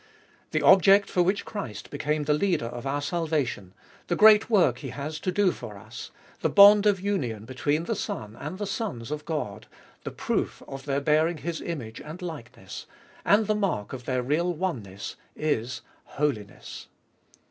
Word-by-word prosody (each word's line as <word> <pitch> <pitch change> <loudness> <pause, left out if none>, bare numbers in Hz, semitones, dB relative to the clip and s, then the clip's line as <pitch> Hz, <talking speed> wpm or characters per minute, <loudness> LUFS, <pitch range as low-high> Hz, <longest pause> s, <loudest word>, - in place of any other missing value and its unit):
The 155 -1 -1
object 195 +5 +6
for 180 - +2
which 190 +3 +1
Christ 130 - -6
became 150 0 -1
the 150 +1 +2
Leader 170 -4 +1
of 120 +3 -6
our 145 +1 -1
salvation, 145 - -2 0.3
the 175 - 0
great 215 +2 +7
work 175 - +3
He - - -6
has 150 +2 -5
to 185 - -1
do 200 -1 +3
for 110 -9 -9
us, 100 - -9 0.3
the - - +1
bond 205 +1 +8
of 200 -2 +3
union 135 - -2
between 145 +5 -1
the 225 +6 -2
Son 110 - -5
and 155 +9 -6
the 205 - -3
sons 195 - -4
of 150 0 -4
God, 110 -10 -4 0.4
the - - -4
proof - - -2
of 135 0 -8
their 140 0 0
bearing 155 +3 +2
His 165 +1 -4
image 120 -10 -6
and 155 +4 -9
likeness, 160 -10 -8 0.4
and 210 +2 +4
the 215 - +1
mark 195 - -1
of 125 -2 -7
their 130 0 -1
real 160 +7 +1
oneness, 120 - -4 0.2
is 130 -5 -1 0.2
Holiness. 130 -9 -4
150 Hz, 170 wpm, -26 LUFS, 125-185 Hz, 0.4 s, bond